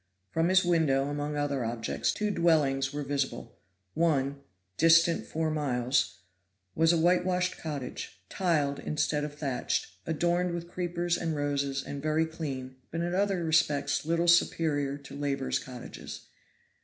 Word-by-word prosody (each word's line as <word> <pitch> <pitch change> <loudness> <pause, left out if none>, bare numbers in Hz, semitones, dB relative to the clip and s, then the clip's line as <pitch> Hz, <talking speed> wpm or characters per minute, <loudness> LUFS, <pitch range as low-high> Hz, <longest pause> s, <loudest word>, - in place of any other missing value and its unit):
From 165 +2 +2
his 185 0 +4
window, 145 -6 +2
among 145 +1 -3
other 140 -3 0
objects, 115 0 -1
two 210 0 -1
dwellings 145 -7 +2
were 145 0 -3
visible; 140 -1 -3 0.3
one, 140 -4 +1 0.3
distant 165 +1 +4
four 160 0 -1
miles, 125 - 0 0.5
was 165 +1 +4
a 170 - +3
whitewashed 180 +2 +2
cottage, 140 - -6
tiled 150 - 0
instead 150 0 -1
of 150 -1 -5
thatched, 140 -9 -2 0.2
adorned 175 +2 +1
with 170 0 -5
creepers 175 -1 -1
and 165 -2 -2
roses 140 -1 -1
and 140 -1 -6
very 155 +2 +2
clean, 135 -5 -6
but 165 - -3
in 175 +1 -1
other 195 -2 +1
respects 150 -3 +2
little 170 +2 +1
superior 150 -5 +3
to 140 -1 -11
laborers' 140 -2 -1
cottages. 125 -2 -8
150 Hz, 140 wpm, -29 LUFS, 140-170 Hz, 0.5 s, his